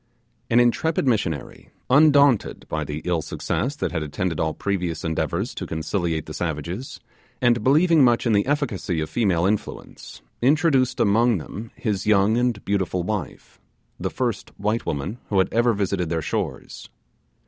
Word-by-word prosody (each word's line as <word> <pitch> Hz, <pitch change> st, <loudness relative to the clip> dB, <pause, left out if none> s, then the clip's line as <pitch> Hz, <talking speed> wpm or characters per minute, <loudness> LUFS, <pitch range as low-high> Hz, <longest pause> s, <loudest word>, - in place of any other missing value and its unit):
An 120 Hz, -, +4 dB
intrepid 135 Hz, +5 st, +2 dB
missionary, 90 Hz, -, -2 dB, 0.2 s
undaunted 140 Hz, -3 st, +4 dB
by -, -, -2 dB
the 75 Hz, +1 st, -6 dB
ill 85 Hz, -2 st, 0 dB
success 135 Hz, -, -3 dB
that 145 Hz, -, -2 dB
had 85 Hz, -3 st, -2 dB
attended 80 Hz, +3 st, -3 dB
all 80 Hz, -1 st, -1 dB
previous 90 Hz, -4 st, -2 dB
endeavours 80 Hz, -1 st, -2 dB
to -, -, -6 dB
conciliate 80 Hz, 0 st, -2 dB
the 75 Hz, -, -8 dB
savages, 85 Hz, -, -4 dB, 0.4 s
and 120 Hz, -3 st, +2 dB
believing 155 Hz, +4 st, +5 dB
much 120 Hz, -1 st, +3 dB
in 115 Hz, -, +2 dB
the 100 Hz, +4 st, +2 dB
efficacy 120 Hz, -, -1 dB
of 80 Hz, 0 st, -3 dB
female 90 Hz, -5 st, +1 dB
influence, 105 Hz, -9 st, -4 dB, 0.2 s
introduced 135 Hz, -1 st, +2 dB
among 115 Hz, +2 st, +3 dB
them 105 Hz, +7 st, -8 dB
his 105 Hz, -2 st, -2 dB
young 105 Hz, +1 st, +4 dB
and 120 Hz, -3 st, 0 dB
beautiful 95 Hz, -3 st, -1 dB
wife, 105 Hz, +1 st, -5 dB, 0.4 s
the -, -, -2 dB
first 120 Hz, -5 st, -3 dB
white 105 Hz, +3 st, -1 dB
woman 80 Hz, -, -3 dB
who 100 Hz, -, 0 dB
had 95 Hz, -, +2 dB
ever 120 Hz, +1 st, +3 dB
visited 100 Hz, -5 st, -1 dB
their 80 Hz, -1 st, -1 dB
shores. -, -, -4 dB
105 Hz, 155 wpm, -23 LUFS, 85-120 Hz, 0.4 s, believing